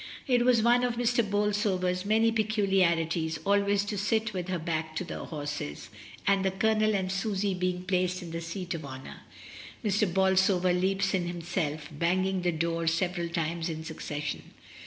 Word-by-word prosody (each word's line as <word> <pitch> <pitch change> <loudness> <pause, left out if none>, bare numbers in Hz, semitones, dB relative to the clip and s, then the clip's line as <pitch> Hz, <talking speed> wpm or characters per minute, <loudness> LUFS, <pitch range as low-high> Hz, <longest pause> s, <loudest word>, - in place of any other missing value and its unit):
It 245 -3 +3
was 245 -3 +4
one 240 +1 +4
of 245 -1 0
Mrs. 235 -2 +1
Bolsover's 200 -3 0
many 225 +2 +3
peculiarities 185 -7 +1
always 200 0 +2
to 205 -1 -3
sit 220 +2 0
with 180 -2 -3
her 185 -1 -1
back 160 -1 -3
to 170 - -1
the - - -6
horses, 145 - -5 0.4
and 195 -1 +3
the 190 - +2
Colonel 215 +2 +2
and 190 -1 -1
Susy 195 0 0
being 180 0 -1
placed 185 -1 0
in 170 - -8
the 165 0 -4
seat 175 +2 -4
of 165 -2 -5
honour, 130 -1 -8 0.7
Mr. 205 -2 +2
Bolsover 190 -1 +3
leaps 195 +2 +1
in 180 -2 0
himself, 165 -3 -3
banging 185 +4 0
the 175 0 +1
door 165 0 -1
several 170 +1 0
times 170 0 -2
in 160 -1 -5
succession. 150 -2 -4
185 Hz, 165 wpm, -29 LUFS, 170-205 Hz, 0.7 s, was